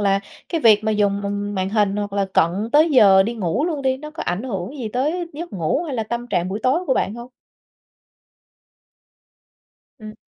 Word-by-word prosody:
là 195 -1 +2 0.3
cái 330 - -1
việc 215 -4 +5
mà 220 - +1
dùng, 200 -1 +1
ừm, 205 0 -3
màn 190 -1 -1
hình 205 -2 +1
hoặc 205 -1 -3
là 200 0 +1
cận 165 - +4 0.2
tới 310 +3 +5
giờ 200 -8 +6
đi 230 +4 -3
ngủ 215 - -1
luôn 310 -5 -2
đi, 260 -1 +1
nó 300 +3 -9
có 315 - -6
ảnh 180 +6 -2
hưởng 225 +2 -5
gì 230 - -4
tới 300 +10 -1
giấc 335 +4 -7
ngủ 180 - -1
hay 285 - -4
là 225 - -1
tâm 235 +2 -4
trạng 180 -6 -1
buổi 205 +3 -4
tối 260 +6 +2
của 260 - +2
bạn 200 - -1
hông? 240 +1 -9 2.7
Ừm. 215 -1 -9
220 Hz, 205 wpm, -21 LUFS, 200-265 Hz, 2.7 s, giờ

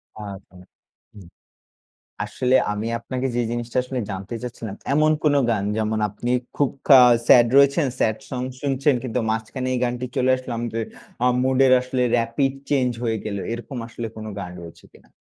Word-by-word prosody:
আচ্ছা। 100 -3 -9 0.6
হুম। 100 -5 -13 1.0
আসলে 125 +5 0 0.2
আমি 105 +2 -3
আপনাকে 130 +2 -3
যে 120 - +1
জিনিসটা 120 +1 -4
আসলে 130 0 -4
জানতে 95 +4 -6
চাচ্ছিলাম, 115 -4 -6 0.2
এমন 155 +1 +4
কোন 150 -2 +3 0.2
গান 105 -3 0
যেমন 110 0 0
আপনি 120 +4 -4 0.2
খুব 145 -3 +2 0.2
খা 135 -2 +9 0.3
স্যাড 120 -1 +7
রয়েছেন, 140 +1 +4
স্যাড 110 0 +1
সং 125 -1 -3 0.2
শুনছেন 140 0 +1
কিন্তু 125 -1 -2
মাঝখানে 110 +4 -3
এই 125 - 0
গানটি 125 0 -2
চলে 130 0 +2
আসলো 130 - -8
আমত 120 -1 -4 0.5
আ - - +5 0.2
মুডের 130 0 +4
আসলে 125 0 -2 0.2
রেপিড 115 +4 0 0.2
চেঞ্জ 130 -3 +2
হয়ে 115 -2 0
গেল। 105 -2 -3 0.2
এরকম 120 +3 -7
আসলে 115 0 -6
কোন 110 - -7
গান 90 -2 -6
রয়েছে 85 -1 -12
কিনা? - - -20
120 Hz, 165 wpm, -22 LUFS, 110-130 Hz, 1.0 s, খা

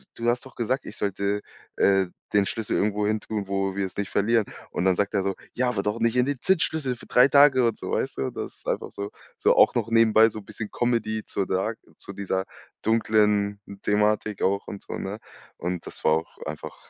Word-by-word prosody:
du 115 - -3
hast 125 +3 0
doch 130 - -14
gesagt, 130 +4 -1
ich - - -6
sollte, 100 +1 -1 0.4
äh, 95 -1 +4 0.3
den 100 -1 +4
Schlüssel 110 +1 -2
irgendwo 105 0 +1
hin 110 0 0
tun, 105 -3 -4
wo 95 0 -1
wir 100 0 0
es 95 - -8
nicht 100 -1 -3
verlieren.“ 110 +1 +2 0.3
Und - - -2
dann 95 -1 +4
sagt 100 0 0
er 100 -2 +1
so: 95 0 -1 0.2
„Ja, 125 0 +1
aber 110 -5 -1
doch 105 +2 -1
nicht 115 +1 +1
in 125 - +4
den 140 -1 -1
Zündschlüssel 160 -7 +1
für - - -14
3 125 +2 +6
Tage“ 140 -3 +6
und 115 -2 +1
so, - - -5
weißt - - -1
du? 65 - -1
Das - - -6
ist - - -16
einfach - - -2
so 100 +1 -5 0.3
so - - +3
auch - - +5
noch 115 -2 0
nebenbei 115 -1 +6
so 110 0 -6
bisschen 105 +1 -6
Comedy 110 -3 0
zu 100 - -2
dark 95 +5 -1 0.2
zu - - -6
dieser 95 -1 -2 0.4
dunklen 105 -2 +2 0.2
Thematik 105 0 +1
auch 100 +1 +1
und 100 - -7
so, - - -6
ne, 100 +3 -5 0.4
und 90 -1 -4
das - - -7
war - - +4
auch 80 +1 -2
einfach - - -6
105 Hz, 220 wpm, -25 LUFS, 100-115 Hz, 0.4 s, 3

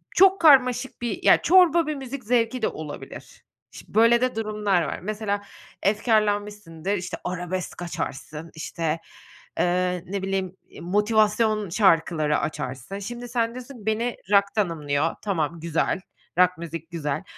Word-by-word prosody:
çok 385 0 +6
karmaşık 260 -5 +4
bir, 240 - -3
ya, - - +6
çorba 340 -3 +5
bir 305 - -1
müzik 270 0 -7
zevki 235 +1 +1
de - - +2
olabilir. 150 -2 -9 0.3
Şi - - -12
böyle 230 +2 +5
de 255 -3 0
durumlar 210 -4 0
var. 155 - -3
Mesela, 205 0 -2 0.4
efkârlanmışsındır, 205 -4 0
işte, 180 -1 -5
arabesk 180 0 -4
açarsın, 155 -1 -5
işte, 160 0 -3 0.6
eee, 180 0 +1
ne 200 0 -3
bileyim, 190 -1 -2
eee, - - -13
motivasyon 210 +2 +2
şarkıları 165 -5 +2
açarsın. 145 +4 -5
Şimdi 240 +4 -7
sen 230 -1 0
diyorsun, 245 -3 -10
"Beni 230 +2 -1
rock 200 0 +6
tanımlıyor.", 160 -5 0
tamam, 170 -5 -1
güzel, 165 +3 -1 0.4
rock 180 -1 +4
müzik 165 0 -7
güzel. 150 -1 -3
200 Hz, 135 wpm, -24 LUFS, 170-230 Hz, 0.6 s, çok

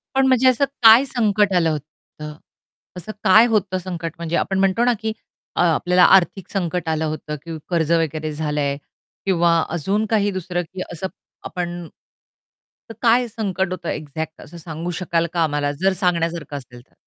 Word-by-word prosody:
पण 270 - +4
म्हणजे 260 0 +4
असं 255 +2 +4 0.2
काय 225 +4 +8
संकट 210 -6 +1
आलं 165 -2 +3
होतं? 150 0 -8 0.6
असं 180 +4 -6
काय 215 +5 +7
होतं 200 -5 0
संकट 170 -3 -5
म्हणजे 170 0 -3
आपण 190 0 -1
म्हणतो 195 +4 +2
ना, 245 - +4
की 220 0 -2 0.4
अ, - - +1
आपल्याला 175 +2 +3
आर्थिक 190 +1 +1
संकट 180 -3 -2
आलं 160 0 0
होतं, 155 -1 -4
की 165 -1 -6
कर्ज 165 -3 0
वगैरे 155 -2 0
झालंय 150 -2 -1 0.5
किंवा 170 -3 +3
अजून 195 +6 -1
काही 205 -2 +2
दुसरं? 180 -1 -3
की 185 - -5
असं 175 +2 -4 0.4
आपण 175 -1 -5 1.0
तर 225 - -7
काय 240 +1 +4
संकट 195 -4 -2
होतं 185 - -4
एक्झॅक्ट 155 +1 -5
असं 170 - -12
सांगू 165 +1 -6
शकाल 170 -1 0
का 170 -2 +2
आम्हाला, 145 -2 0
जर 185 +7 0
सांगण्यासारखं 170 -5 -1
असेल 125 -2 -12
तर. - - -35
175 Hz, 165 wpm, -21 LUFS, 160-195 Hz, 1.0 s, काय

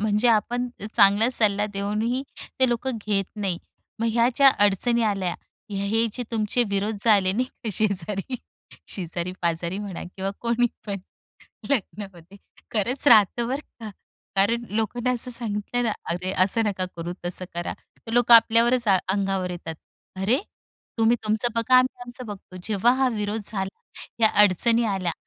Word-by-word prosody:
म्हणजे 210 +2 +2
आपण 240 +2 +1 0.3
चांगला 205 +2 +5
सल्ला 210 -3 +2
देऊनही 215 +6 -1 0.4
ते 260 - +5
लोक 240 +2 -1
घेत 210 -4 -1
नाहीत. 195 -4 -2 0.4
मग 230 - +1
ह्या 235 +1 +3
ज्या 275 -1 +7 0.2
अडचणी 235 +4 +2
आल्या, 195 -5 0 0.4
हे 210 +4 +1
जे 245 - -4
तुमचे 225 +1 +1
विरोध 205 +2 -1
झाले 200 -4 +4
नाही 245 +6 0
का, 245 -2 -9
शेजारी, 200 +2 -1 0.5
शेजारी-पाजारी 175 0 -3
म्हणा 200 -4 -6
किंवा 195 0 -2
कोणी 235 +1 +2 0.2
पण. 200 -1 -3 0.7
लग्नामध्ये 195 - -4 0.4
खरंच 235 +6 -1
राहतं 230 +1 +5
बरं 270 +3 -2 0.2
का. 215 - -5 0.5
कारण 230 +5 +2
लोकांना 225 +4 -1
असं 250 +1 0
सांगितलं 230 0 -2
ना, 225 - +1 0.2
"अरे 180 +2 -2
असं 225 +4 +1
नका 195 -3 -1
करू, 170 +1 -4
तसं 175 +1 -4
करा." 175 0 -3
तर 225 - -14
लोक 240 0 +4
आपल्यावरच 235 +2 +6
अंगावर 195 -1 +1
येतात, 165 -2 -6 0.4
"अरे, 210 +8 +2 0.6
तुम्ही 225 +2 +4
तुमचं 215 +3 +1
बघा, 230 +2 +2
आम्ही 255 0 +2
आमचं 245 +1 -7
बघतो." 195 -3 -9
जेव्हा 220 +2 +3
हा 260 - +4
विरोध 210 +1 -2
झाला, 195 -2 -4 0.4
या 220 - +6
अडचणी 230 +4 +3
आल्या, 190 -5 -1
210 Hz, 145 wpm, -24 LUFS, 195-235 Hz, 0.7 s, ज्या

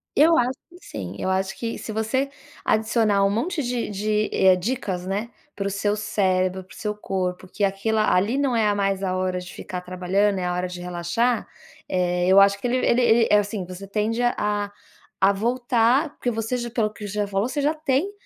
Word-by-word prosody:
Eu 325 +2 +6
acho 250 +2 +2 0.2
que 350 - -15
sim. 95 -2 -7
Eu - - -2
acho 190 0 -1
que 230 -1 -3
se - - -6
você 220 +6 0 0.3
adicionar 220 -2 +2
um - - +3
monte 300 - -1
de 245 -2 -2
de, 210 +1 0
eh, 190 -1 +5
dicas 185 -3 -3
né, 210 +5 -2 0.2
para 195 - -3
o - - 0
seu 205 +1 0
cérebro, 190 -3 0
para 185 - -17
o - - -14
seu 210 -1 -3
corpo 185 -2 -3
que 205 - -4
aquilo, 200 +3 0
ali, 215 +4 +2
não 275 -3 +1
é 215 -2 +3
mais 195 -1 0
a 185 -1 0
hora 185 0 -1
de 180 0 -9
ficar 180 -1 -6
trabalhando, 185 +3 0
é 180 - -2
a 180 - 0
hora 180 +1 -1
de 180 0 -8
relaxar. 180 +7 -1 0.4
Eh, 180 -1 +1
eu 190 +1 +7
acho 200 0 +5
que 245 - -2
ele 250 - +1
ele 250 -1 +2
ele, 230 -1 +4
é 210 - +7
assim, 205 -2 -3
você 185 +2 -9
tende 215 +3 -1
a 245 0 +2
a 205 -1 -1 0.5
a 195 - +5
voltar, 240 +5 +2
porque 245 - -2
você 225 +1 -2
já, 240 -1 -4
pelo 225 -3 0
que 210 -2 -7
você 200 - -6
já 210 -1 0
falou, 200 +2 0
você 290 +3 -2
já 295 +3 +2
tem 310 +4 0
210 Hz, 220 wpm, -24 LUFS, 190-235 Hz, 0.5 s, eu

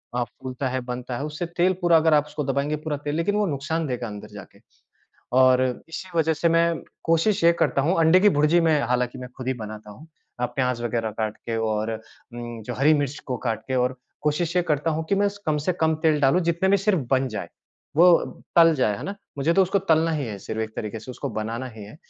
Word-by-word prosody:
अ, 125 - +1
फ़ूलता 130 +3 -6
है, 130 +1 -1
बनता 125 0 -5
है 140 - -4
उससे 155 +3 -4
तेल 180 +2 +4
पूरा 175 -1 +5
अगर 160 0 +3
आप 150 -1 +4
उसको 150 0 -4
दबाएँगे 140 +2 -1
पूरा 150 -2 -1
तेल 145 0 -1
लेक़िन 175 +6 0
वो 210 0 +2
नुकसान 155 +2 -2
देगा 125 -2 -3
अंदर 105 -1 -8
जाके। - - -12 0.8
और 130 0 +5 0.3
इसी 185 +3 -7
वजह 160 0 +3
से 170 +2 +1
मैं 165 0 +2 0.2
कोशिश 165 +5 +2
ये 170 - +7
करता 135 - +2
हूँ 165 +5 +1
अंडे 165 +3 +6
की 205 - +6
भुर्जी 150 +4 +4
में 160 -2 +3
हालाँकि 125 0 0
मैं 125 0 -7
ख़ुद 130 - -6
ही 130 - +1
बनाता 110 -2 -8
हूँ। 110 +11 -13 0.3
प्याज 125 0 -1
वग़ैरह 115 -1 -1
काट 110 0 -3
के 115 -1 -5
और 110 0 -1
अ, 110 - -3 0.4
जो 120 -1 -6
हरी 140 +5 +4
मिर्च 145 -1 -1
को 125 - -2
काट 110 -2 -1
के 130 - -1
और 125 +1 +1 0.3
कोशिश 155 +3 0
ये 180 - +4
करता 155 -1 0
हूँ 160 +1 -2
कि - - +3
मैं 200 +1 +2 0.2
कम 155 -1 +2
से 185 - +3
कम 160 0 +3
तेल 155 -3 +3
डालूँ 140 +6 +4
जितने 170 +3 0
में 200 - +5
सिर्फ़ 195 -2 +1
बन 135 0 +3
जाए 110 - -5 0.5
वो 175 +3 +7 0.5
तल 165 -1 +7
जाए 110 -7 +1
है - - -8
ना? 200 - -4 0.2
मुझे 145 +4 +2
तो 195 - +5
उसको 190 +2 +1
तलना 160 +1 +4
ही 150 -3 -1
है 105 -3 -6
सिर्फ़ 110 +3 -5
एक 110 - -4
तरीक़े 110 +1 -4
से 120 - -9
उसको 125 - -5
बनाना 115 +4 -4
ही 105 - -8
है। 105 +7 -12
145 Hz, 235 wpm, -24 LUFS, 120-165 Hz, 0.8 s, ये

